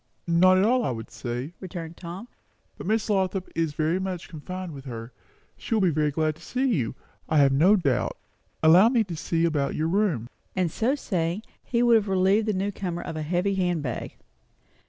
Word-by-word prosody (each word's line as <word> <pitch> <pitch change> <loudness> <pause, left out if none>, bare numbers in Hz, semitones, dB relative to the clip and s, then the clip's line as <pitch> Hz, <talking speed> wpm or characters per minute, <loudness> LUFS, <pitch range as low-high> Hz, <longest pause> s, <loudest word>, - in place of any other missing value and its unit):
"Not 180 +2 +5
at 190 - +4
all, 245 +3 +3
I 125 - -1
should 115 - -9
say," 125 +6 -5
returned 170 -3 -7
Tom; 180 +7 -8 0.5
"but - - -8
Miss 220 +1 +1
Lothrop 190 -2 0
is 165 -2 -1
very 160 +4 +1
much 185 -2 -4
confined 180 +2 -6
with 135 -1 -10
her. 115 -2 -7 0.5
She 225 - -2
will 215 - +2
be 185 -3 +3
very 150 0 +1
glad 155 +1 0
to - - -19
see 255 +1 -1
you, 130 - -1 0.3
I 155 - +2
have 140 -2 +6
no 165 +10 +5
doubt. 140 - 0 0.5
Allow 175 +8 +7
me 240 -3 +3
to 180 -5 -6
see 165 +1 0
about 150 -4 0
your 155 - 0
room." 170 - +1 0.3
And 180 -3 +1
so 245 - +1
saying, 180 - -2 0.2
he 240 -1 +1
would 235 -1 +6
have 210 -1 -1
relieved 195 +3 +3
the 215 - +2
new 195 +2 -1
comer 175 -3 -4
of - - -6
a 155 - -3
heavy 180 +5 0
handbag. 175 -9 -2
175 Hz, 200 wpm, -26 LUFS, 155-195 Hz, 0.5 s, Allow